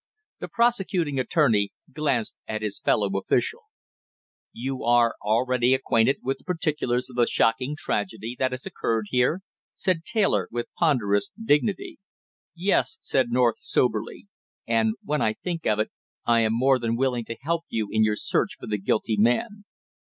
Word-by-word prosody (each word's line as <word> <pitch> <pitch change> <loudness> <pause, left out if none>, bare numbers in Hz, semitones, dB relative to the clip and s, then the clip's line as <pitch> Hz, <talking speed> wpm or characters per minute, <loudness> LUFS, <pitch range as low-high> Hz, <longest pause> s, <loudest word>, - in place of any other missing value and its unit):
The - - -5
prosecuting 195 - +1
attorney 125 - +2 0.2
glanced 135 -7 -1
at 110 0 -3
his 105 -2 -3
fellow 105 - +2
official. 455 - -1 0.9
"You 130 +2 -4
are 120 0 +4
already 125 +4 +2
acquainted 130 0 +2
with 135 +1 -2
the - - -23
particulars 150 -8 -1
of 125 - -12
the 120 - +4
shocking 125 +6 +1
tragedy 110 -1 -3
that 130 - +2
has 130 0 -6
occurred 110 -2 -2
here?" 125 +8 +2 0.3
said 180 -3 0
Taylor 215 -1 +1
with 120 0 -5
ponderous 125 - +1
dignity. 195 -1 0 0.6
"Yes," 195 +8 +1
said 130 -3 +1
North 120 -1 +2
soberly. 110 - -1 0.4
"And 115 -1 +1
when 150 +1 -1
I 110 - +2
think 170 +5 -4
of 105 - +2
it, 110 - -1 0.3
I 120 -1 +4
am 110 -1 +2
more 130 +1 +4
than 115 -1 -1
willing 125 -3 0
to 115 - -6
help 165 +4 -2
you 110 -2 -1
in 110 0 +3
your 105 -1 +2
search - - -1
for - - -8
the 105 -1 -2
guilty 110 +2 0
man." 205 - +1
125 Hz, 160 wpm, -25 LUFS, 110-150 Hz, 0.9 s, are